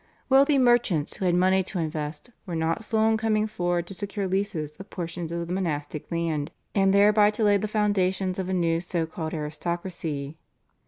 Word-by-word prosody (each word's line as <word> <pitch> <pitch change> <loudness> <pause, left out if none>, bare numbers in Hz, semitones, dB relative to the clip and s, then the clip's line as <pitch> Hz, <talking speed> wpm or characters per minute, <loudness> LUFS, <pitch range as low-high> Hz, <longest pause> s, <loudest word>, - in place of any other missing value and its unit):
Wealthy 275 +2 +5
merchants 240 - +2
who 190 - -2
had 175 -1 +3
money 185 +1 +4
to 185 +1 -5
invest 155 +4 -4 0.2
were 175 - -3
not 165 +6 -1
slow 220 0 +2
in 220 0 +3
coming 215 -1 +1
forward 175 -5 -1
to 195 - -8
secure 200 0 -3
leases 185 -6 -2
of 195 +1 -11
portions 170 -1 -5
of 170 0 -2
the 175 - -3
monastic 155 -5 -3
land 165 -3 -1 0.2
and 195 -1 +3
thereby 205 +1 +5
to 215 +1 -2
lay 205 -1 +5
the 215 - -2
foundations 195 -3 0
of 185 -1 -3
a - - 0
new 165 -2 +1
so 175 -2 -1
called 160 0 -5
aristocracy. 155 -1 -4
185 Hz, 190 wpm, -26 LUFS, 165-205 Hz, 0.2 s, Wealthy